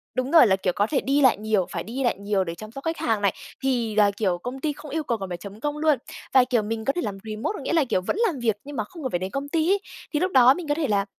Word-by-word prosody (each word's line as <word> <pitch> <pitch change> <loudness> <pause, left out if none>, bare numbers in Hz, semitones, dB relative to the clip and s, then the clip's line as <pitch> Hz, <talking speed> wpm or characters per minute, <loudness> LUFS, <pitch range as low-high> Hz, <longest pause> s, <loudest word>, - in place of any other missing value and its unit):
đúng 255 +2 -1
rồi, 320 -8 +8
là, 190 - +4
kiểu, 185 -2 -1
có 205 +1 +2
thể 275 - 0
đi 280 +2 +1
lại 260 -6 +5
nhiều, 210 -3 +1
phải - - -3
đi 255 +5 -4
lại 240 - +1
nhiều 200 -1 0
để 165 -1 -5
chăm 215 +4 -10
sóc 275 +3 -9
khách 325 0 -1
hàng 220 -3 0
này, 200 -2 +2 0.3
thì 235 -5 0
là, 205 -1 +5
kiểu, 185 -5 +1
công 250 +8 -6
ty 300 0 0
không 300 0 -11
yêu 315 0 -1
cầu 235 -4 -1
cần 195 -2 -6
phải 175 - -4
chấm 200 +3 -10
công 295 +2 -2
luôn. 305 -2 +3 0.4
Và 260 -2 +7
kiểu 245 -3 +1
mình 220 +1 -4
có 275 - +2
thể 350 - -2
làm 200 -2 -4
remote 215 - -3
có - - -6
nghĩa - - -2
là, 325 - +4
kiểu, 185 - 0
vẫn 190 - -2
làm 300 -7 -3
việc 225 -4 +1
nhưng 290 +1 -8
mà 215 - 0
không 310 +8 -11
cần 260 - -2
phải 175 - 0
đến 185 +1 -4
công 280 +1 -4
ty 325 +1 +1
ấy, 400 - +3 0.3
thì 295 - +2
lúc 370 +2 0
đó 255 0 +7
mình 335 0 -7
có 290 - +1
thể 305 -3 -1
là 200 -1 +1
240 Hz, 335 wpm, -24 LUFS, 205-290 Hz, 0.4 s, rồi